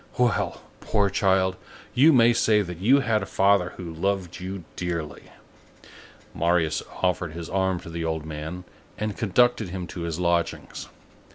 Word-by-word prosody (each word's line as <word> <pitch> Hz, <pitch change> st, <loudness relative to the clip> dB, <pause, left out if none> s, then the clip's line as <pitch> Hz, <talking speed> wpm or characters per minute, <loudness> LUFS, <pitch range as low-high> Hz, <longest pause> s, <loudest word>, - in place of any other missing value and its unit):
Well! 125 Hz, -1 st, 0 dB, 0.2 s
poor 100 Hz, -2 st, +1 dB
child, 95 Hz, -1 st, +2 dB, 0.4 s
you 145 Hz, +6 st, +6 dB
may 120 Hz, -4 st, +6 dB
say 110 Hz, -2 st, +3 dB
that 90 Hz, -2 st, -7 dB
you 130 Hz, +9 st, +4 dB
had 115 Hz, -4 st, +1 dB
a 95 Hz, -, -5 dB
father 95 Hz, -2 st, +2 dB
who 85 Hz, -3 st, -7 dB
loved 95 Hz, 0 st, -2 dB
you 95 Hz, 0 st, -6 dB
dearly!" 85 Hz, -3 st, -4 dB, 1.1 s
Marius 85 Hz, -1 st, +1 dB, 0.2 s
offered 90 Hz, -3 st, 0 dB
his 85 Hz, 0 st, -7 dB
arm 95 Hz, -2 st, +1 dB
to 85 Hz, -, -10 dB
the 85 Hz, 0 st, -4 dB
old 80 Hz, -1 st, -2 dB
man 80 Hz, +3 st, -6 dB, 0.3 s
and 105 Hz, 0 st, -3 dB
conducted 115 Hz, 0 st, +2 dB
him 90 Hz, 0 st, -5 dB
to 85 Hz, -, -8 dB
his 85 Hz, 0 st, -3 dB
lodgings. 85 Hz, -1 st, -1 dB
90 Hz, 155 wpm, -25 LUFS, 85-100 Hz, 1.1 s, you